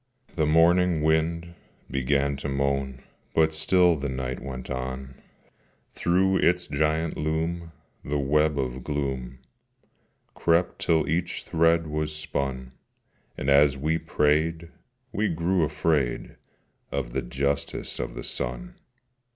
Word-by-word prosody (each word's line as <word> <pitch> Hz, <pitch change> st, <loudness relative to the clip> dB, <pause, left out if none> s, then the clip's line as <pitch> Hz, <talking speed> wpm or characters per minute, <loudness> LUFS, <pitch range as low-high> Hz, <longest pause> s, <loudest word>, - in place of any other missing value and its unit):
The 80 Hz, -3 st, +1 dB
morning 85 Hz, +1 st, +4 dB
wind 85 Hz, +2 st, +1 dB, 0.4 s
began 70 Hz, +2 st, +1 dB
to 70 Hz, +1 st, -4 dB
moan, 70 Hz, -1 st, -1 dB, 0.3 s
But 80 Hz, 0 st, +4 dB
still 85 Hz, +2 st, +4 dB
the 70 Hz, -2 st, -3 dB
night 65 Hz, -1 st, -3 dB
went 65 Hz, -2 st, -7 dB
on: 65 Hz, +1 st, -4 dB, 0.8 s
Through 95 Hz, +2 st, +2 dB
its 90 Hz, 0 st, +2 dB
giant 80 Hz, +2 st, 0 dB
loom 80 Hz, +2 st, -2 dB, 0.3 s
the 75 Hz, +1 st, -1 dB
web 75 Hz, +2 st, +2 dB
of 65 Hz, -1 st, -3 dB
gloom 65 Hz, -4 st, -3 dB, 1.0 s
Crept 85 Hz, +1 st, +1 dB
till 80 Hz, -1 st, +2 dB
each 85 Hz, +3 st, -1 dB
thread 80 Hz, 0 st, +3 dB
was 75 Hz, 0 st, -2 dB
spun: 70 Hz, -4 st, -3 dB, 0.7 s
And, -, -, -4 dB
as 70 Hz, 0 st, +5 dB
we 80 Hz, +4 st, 0 dB
prayed, 80 Hz, +3 st, +1 dB, 0.4 s
we 105 Hz, +1 st, 0 dB
grew 85 Hz, +3 st, +1 dB
afraid 75 Hz, -4 st, 0 dB, 0.6 s
Of 65 Hz, -4 st, -3 dB
the 65 Hz, -, 0 dB
Justice 70 Hz, +3 st, -2 dB
of -, -, -4 dB
the -, -, -6 dB
Sun. -, -, -4 dB
75 Hz, 120 wpm, -26 LUFS, 70-80 Hz, 1.0 s, as